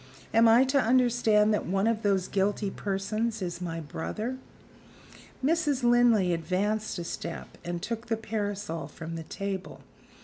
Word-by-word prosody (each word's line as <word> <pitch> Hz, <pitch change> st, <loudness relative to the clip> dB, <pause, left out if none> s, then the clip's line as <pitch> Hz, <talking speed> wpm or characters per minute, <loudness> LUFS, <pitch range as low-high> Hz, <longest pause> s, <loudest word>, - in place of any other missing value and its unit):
"Am 225 Hz, +1 st, +6 dB
I 230 Hz, +3 st, +7 dB
to 270 Hz, +1 st, +2 dB
understand 230 Hz, -3 st, +3 dB
that 210 Hz, -, -1 dB
one 195 Hz, +3 st, +1 dB
of 225 Hz, -1 st, +1 dB
those 195 Hz, -3 st, +1 dB
guilty 200 Hz, +1 st, 0 dB
persons 215 Hz, +4 st, -2 dB
is 175 Hz, -2 st, -4 dB
my 165 Hz, -2 st, -3 dB
brother?" 215 Hz, -, -4 dB, 1.1 s
Mrs. 295 Hz, -4 st, +1 dB
Linley 240 Hz, -6 st, +4 dB
advanced 200 Hz, +6 st, -1 dB
a 175 Hz, -, -3 dB
step 170 Hz, 0 st, -6 dB
and 175 Hz, 0 st, -4 dB
took 230 Hz, +2 st, -4 dB
the 225 Hz, -1 st, 0 dB
parasol 205 Hz, -7 st, -3 dB
from 160 Hz, +2 st, -8 dB
the 165 Hz, -, -4 dB
table. 195 Hz, +1 st, -5 dB
210 Hz, 145 wpm, -28 LUFS, 185-230 Hz, 1.1 s, I